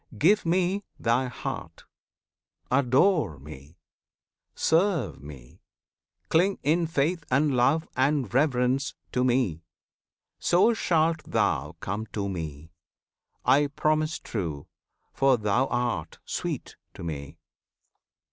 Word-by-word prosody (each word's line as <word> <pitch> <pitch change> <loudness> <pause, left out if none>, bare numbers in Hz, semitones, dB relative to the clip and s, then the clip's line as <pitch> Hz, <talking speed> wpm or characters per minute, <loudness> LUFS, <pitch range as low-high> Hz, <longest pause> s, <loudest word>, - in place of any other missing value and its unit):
Give 190 - +3
Me 185 +3 +1 0.2
thy 120 +3 +1
heart! 125 - -6 0.9
adore 135 - +3
Me! 70 +3 -12 0.8
serve 165 - +1
Me! 70 -4 -12 0.7
cling 185 +4 +2
In 165 +3 +2
faith 165 +2 0
and 140 +1 +2
love 140 +7 +2
and 130 -4 +1
reverence 130 -1 +1 0.2
to 125 - +1
Me! 120 -10 +1 0.8
So 185 +7 +4
shalt 165 -6 +1
thou - - 0
come 105 +3 -3
to 100 -2 -2
Me! 80 -4 -6 0.7
I 140 +3 +4
promise 155 +2 0
true, 80 -10 -4 0.5
For 135 -2 +3
thou 110 +5 +1
art 120 -10 -2
sweet - - -4 0.2
to - - -8
Me! 75 -2 -6
130 Hz, 105 wpm, -27 LUFS, 100-160 Hz, 0.9 s, So